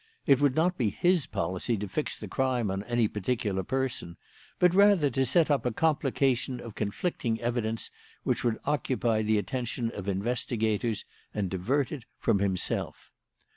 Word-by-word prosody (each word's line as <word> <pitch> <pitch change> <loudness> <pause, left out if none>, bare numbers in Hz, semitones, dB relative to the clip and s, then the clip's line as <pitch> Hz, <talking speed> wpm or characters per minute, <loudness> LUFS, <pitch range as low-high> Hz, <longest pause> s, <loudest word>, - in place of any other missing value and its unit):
It 140 -1 +5
would 140 -3 +3
not 175 +2 +2
be 115 -4 +2
his 175 - +2
policy 95 +7 -1
to 100 +1 -4
fix 150 +11 -3
the - - -6
crime 125 -6 0
on 95 0 -2
any 120 -2 +2
particular 105 -2 -1
person, 125 -6 -2 0.4
but 180 -1 +4
rather 195 -7 +5
to 135 +2 +1
set 155 +4 +3
up 140 - +2
a 125 - 0
complication 135 -3 +1
of 115 - -8
conflicting 115 - -2
evidence 115 -2 -1 0.3
which - - 0
would 115 -2 +1
occupy 125 -5 +1
the 110 0 +2
attention 120 +3 -2
of 100 -2 -5
investigators 110 +1 -1 0.3
and 100 -4 -1
divert 125 +10 0
it 135 -7 -6
from 110 -4 +2
himself. 95 -2 -2
120 Hz, 160 wpm, -29 LUFS, 105-135 Hz, 0.4 s, It